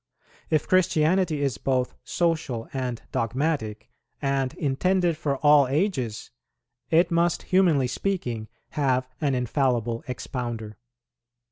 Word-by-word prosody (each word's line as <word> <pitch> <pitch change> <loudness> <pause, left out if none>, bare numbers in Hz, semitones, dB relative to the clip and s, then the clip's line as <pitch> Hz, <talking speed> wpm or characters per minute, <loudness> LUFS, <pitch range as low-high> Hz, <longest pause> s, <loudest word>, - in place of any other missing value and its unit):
If 155 -2 +1
Christianity 170 -3 +2
is 130 -9 -1
both 130 0 0
social 155 -9 -1
and 125 -3 -3
dogmatic, 115 -2 -2 0.3
and 135 -2 0
intended 175 +5 +1
for 145 -3 -1
all 145 -2 +7
ages, 135 - -1 0.6
it 170 +2 +4
must 170 0 +2
humanly 175 -8 +3
speaking 125 - -2 0.2
have 130 -3 0
an 140 -3 +1
infallible 120 -2 0
expounder. 120 -4 -5
135 Hz, 105 wpm, -25 LUFS, 125-165 Hz, 0.6 s, all